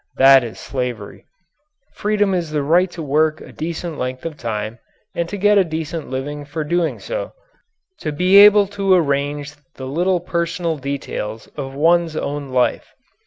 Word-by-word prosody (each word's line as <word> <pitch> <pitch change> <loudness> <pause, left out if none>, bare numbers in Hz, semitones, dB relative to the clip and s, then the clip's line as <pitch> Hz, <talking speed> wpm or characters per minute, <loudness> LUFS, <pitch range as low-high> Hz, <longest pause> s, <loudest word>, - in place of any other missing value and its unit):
That 135 -1 +7
is 115 -2 -7
slavery. 125 -6 -5 0.7
Freedom 205 -2 +1
is 175 -3 -1
the 150 -2 -1
right 175 +5 +3
to 170 -2 -7
work 155 +2 +1
a - - -12
decent 165 0 -5
length 130 +2 -4
of 165 -2 -4
time 110 -3 -4 0.3
and 170 0 -2
to 205 - -4
get 205 +1 +4
a - - +5
decent 160 -1 -5
living 145 +3 -4
for 150 +2 -4
doing 170 +2 0
so; - - -5 0.7
to 155 - -3
be 180 +6 +4
able 205 0 +8 0.2
to 195 -1 +5
arrange 145 -2 0 0.2
the 130 - -7
little 175 +7 +1
personal 170 -1 -2
details 130 -5 -5
of 135 -2 -6
one's 165 +2 +2
own 145 -2 -3
life. 125 -1 0
155 Hz, 165 wpm, -20 LUFS, 135-175 Hz, 0.7 s, able